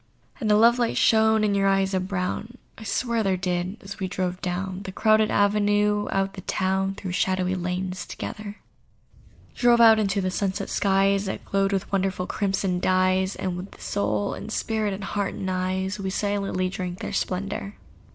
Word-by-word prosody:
And 215 -5 0
a - - +6
love 235 +3 +5
light 235 -1 0
shone 220 -1 +4
in 210 -1 +2
your 195 0 +2
eyes 195 0 +2
of 185 0 0
brown— 200 +5 -3 0.2
I 225 - -11
swear 230 +3 0
there 195 -3 +1
did!—as 185 +3 -3
we 190 - -1
drove 185 -1 -3
down 185 +1 -3
The 195 -1 -6
crowded 215 +2 +3
avenue 205 0 +2
out 195 0 +1
of - - -24
the 190 - -8
town, 190 +1 0
Through 190 -2 -5
shadowy 185 0 0
lanes, 185 +1 -3
together: 210 -2 -6 1.0
Drove 240 -1 +4
out 225 -1 +7
into 200 -1 +1
the 185 -1 -1
sunset 190 0 -2
skies 195 0 +2
That 190 - -5
glowed 195 0 +1
with 195 -2 -2
wonderful 190 -2 0
crimson 195 -2 -1
dyes; 185 +1 +2
And 185 -2 -3
with 180 +3 -8
soul 100 0 -1
and 215 - -7
spirit, 220 -2 -1
and 200 - -8
heart 200 0 -2
and 190 - -3
eyes, 185 +2 -2
We 190 -1 -2
silently 200 -2 -1
drank 180 -1 -4
their - - -5
splendour. 195 +2 -3
195 Hz, 180 wpm, -25 LUFS, 185-205 Hz, 1.0 s, out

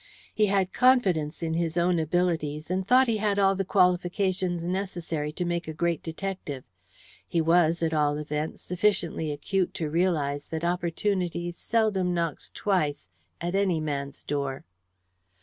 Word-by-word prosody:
He 215 -1 +3
had 195 -2 +1
confidence 185 - +3
in 160 -1 -1
his 165 0 -1
own 175 0 +3
abilities, 160 -2 -1
and 185 +1 -1
thought 255 +3 +6
he 225 -2 +1
had 205 -1 0
all 195 -1 +4
the 195 - 0
qualifications 180 -1 +1
necessary 175 -5 -3
to 180 - -2
make 175 -1 -2
a 160 - -4
great 170 0 0
detective. 165 -5 -5 0.6
He 170 - 0
was, 165 0 +3
at 160 -1 +1
all 150 -1 +2
events, 150 +1 -4
sufficiently 180 -4 0
acute 180 +6 -1
to 155 -3 -3
realize 150 -5 0
that 160 0 -4
opportunity 175 0 -1
seldom 190 -2 0
knocks 165 -3 -2
twice 155 - 0 0.3
at 175 +1 -3
any 195 -4 +2
man's 140 -3 -4
door. 140 -2 -3
175 Hz, 150 wpm, -27 LUFS, 155-190 Hz, 0.6 s, thought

